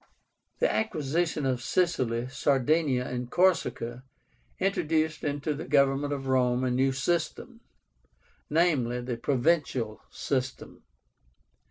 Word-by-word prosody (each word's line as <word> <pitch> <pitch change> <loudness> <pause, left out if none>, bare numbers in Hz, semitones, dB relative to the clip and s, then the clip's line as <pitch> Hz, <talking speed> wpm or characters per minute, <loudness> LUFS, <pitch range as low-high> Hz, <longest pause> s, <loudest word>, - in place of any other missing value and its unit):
The - - +2
acquisition 160 -6 -1
of 130 -2 0
Sicily, 125 -8 0
Sardinia, 135 0 +1
and 125 -1 -4
Corsica 125 -9 +1 0.5
introduced 160 -5 0
into 145 +1 -1
the 150 - -7
government 140 0 +2
of 140 -2 -3
Rome 125 -1 +2
a 130 - +1
new 135 +2 +2
system; 155 +5 -2 0.9
viz. 140 -7 +1
the 120 -2 -4
PROVINCIAL 130 -5 0
SYSTEM. 130 -2 -4
135 Hz, 105 wpm, -28 LUFS, 125-160 Hz, 0.9 s, The